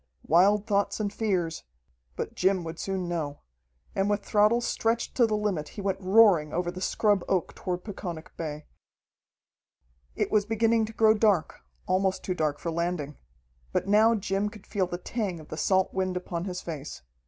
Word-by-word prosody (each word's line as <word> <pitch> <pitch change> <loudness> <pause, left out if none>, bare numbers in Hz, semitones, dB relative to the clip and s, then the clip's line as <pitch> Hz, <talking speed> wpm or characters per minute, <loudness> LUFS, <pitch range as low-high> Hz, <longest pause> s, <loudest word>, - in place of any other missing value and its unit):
Wild 195 +6 +4
thoughts 200 -1 0
and 205 -1 -2
fears 185 -8 -1 0.5
but - - -4
Jim 190 -1 +1
would 165 0 -7
soon 190 -2 -2
know. 155 -4 -3 0.5
And 195 +1 0
with 205 -1 -1
throttle 210 +3 +4
stretched 230 -1 -1
to 240 -3 +4
the 215 -1 0
limit 195 -8 -1
he - - -3
went 195 0 -2
roaring 190 -6 +5
over 175 +1 -1
the 180 +1 -8
scrub 205 -1 +2
oak 185 -3 0
toward 180 -1 -4
Peconic 175 -6 -7
Bay. 150 -2 -5 1.5
It - - -1
was 215 -1 +4
beginning 225 0 +2
to 220 - -9
grow 220 0 +5
dark, 210 -6 +1 0.3
almost 190 0 +1
too 185 - -1
dark 155 -4 -1
for 170 - -4
landing. 165 -4 -3 0.5
But - - -1
now 215 +3 +5
Jim 200 0 -1
could 210 -2 -14
feel 195 -4 -1
the 175 - -4
tang 190 -2 -3
of 155 - -13
the - - -5
salt 190 +2 +2
wind 185 -1 -1
upon 175 -1 -4
his 180 -2 -4
face. 155 - -7
190 Hz, 175 wpm, -27 LUFS, 175-210 Hz, 1.5 s, roaring